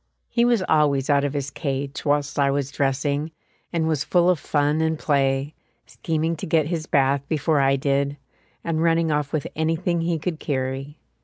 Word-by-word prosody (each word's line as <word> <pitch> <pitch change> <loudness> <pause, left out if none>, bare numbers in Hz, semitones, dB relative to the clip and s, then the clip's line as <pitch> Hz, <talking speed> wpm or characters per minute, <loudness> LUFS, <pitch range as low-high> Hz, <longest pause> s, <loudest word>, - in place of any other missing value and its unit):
He 235 0 +3
was 240 -5 +2
always 145 -2 +2
out 140 0 +3
of 145 -1 -1
his 140 -1 -3
cage 140 -1 -4
whilst 145 0 0
I 140 -1 +3
was 140 0 -1
dressing, 140 +2 -1 0.4
and 165 -2 0
was 155 -3 0
full 175 0 +3
of 175 - -1
fun 145 +1 +1
and 160 0 0
play, 140 -1 0 0.3
scheming 165 0 -2
to - - -6
get 160 -2 +2
his 160 -1 -3
bath 140 0 +2
before 155 -1 +1
I 135 0 +3
did, 140 +1 0 0.5
and 160 -1 -1
running 165 -1 +2
off 150 -1 -1
with 155 -3 -2
anything 165 +2 0
he 165 0 0
could 160 0 -4
carry. 135 +1 -3
150 Hz, 180 wpm, -23 LUFS, 140-160 Hz, 0.5 s, He